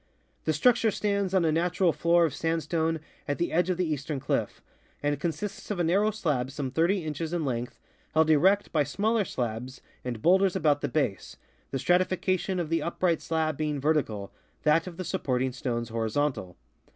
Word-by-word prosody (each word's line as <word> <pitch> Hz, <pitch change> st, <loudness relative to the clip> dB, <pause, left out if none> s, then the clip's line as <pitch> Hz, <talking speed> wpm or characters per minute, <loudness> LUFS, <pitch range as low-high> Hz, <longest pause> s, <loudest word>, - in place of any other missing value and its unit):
The 155 Hz, -, +2 dB
structure 235 Hz, -, +4 dB
stands 200 Hz, -2 st, 0 dB
on 190 Hz, -3 st, +3 dB
a 160 Hz, -, +3 dB
natural 175 Hz, +1 st, +2 dB
floor 170 Hz, 0 st, +3 dB
of 155 Hz, -, -2 dB
sandstone 165 Hz, 0 st, -1 dB, 0.3 s
at 145 Hz, -, -1 dB
the 175 Hz, -, -1 dB
edge 175 Hz, +2 st, +2 dB
of 180 Hz, -, 0 dB
the 180 Hz, -, +1 dB
eastern 150 Hz, -2 st, -3 dB
cliff, -, -, -1 dB, 0.4 s
and 145 Hz, -1 st, 0 dB
consists 175 Hz, +6 st, -4 dB
of 205 Hz, -4 st, -2 dB
a -, -, +2 dB
narrow 195 Hz, +6 st, +3 dB
slab 150 Hz, -12 st, -1 dB
some 135 Hz, -1 st, -4 dB
30 170 Hz, +6 st, +2 dB
inches 155 Hz, +2 st, -4 dB
in 170 Hz, -3 st, -1 dB
length 120 Hz, -2 st, -3 dB, 0.4 s
held 160 Hz, 0 st, +4 dB
erect 190 Hz, +7 st, +4 dB
by 150 Hz, -3 st, +3 dB
smaller 210 Hz, -, 0 dB
slabs 125 Hz, -1 st, -4 dB, 0.2 s
and 120 Hz, -3 st, -5 dB
bowlders 190 Hz, +1 st, +4 dB
about 150 Hz, -5 st, +2 dB
the -, -, -1 dB
base, 130 Hz, -10 st, -2 dB, 0.3 s
the 135 Hz, -, -2 dB
stratification 185 Hz, +3 st, +1 dB
of 165 Hz, -3 st, -2 dB
the 165 Hz, 0 st, +1 dB
upright 170 Hz, -1 st, 0 dB
slab 160 Hz, -2 st, -1 dB
being 150 Hz, -2 st, -1 dB
vertical, 135 Hz, -9 st, 0 dB, 0.3 s
that 160 Hz, +3 st, +3 dB
of 170 Hz, -2 st, -8 dB
the 185 Hz, -, -4 dB
supporting 130 Hz, -8 st, -1 dB
stones 120 Hz, -2 st, -3 dB
horizontal. 115 Hz, -3 st, -1 dB
160 Hz, 180 wpm, -28 LUFS, 140-180 Hz, 0.4 s, structure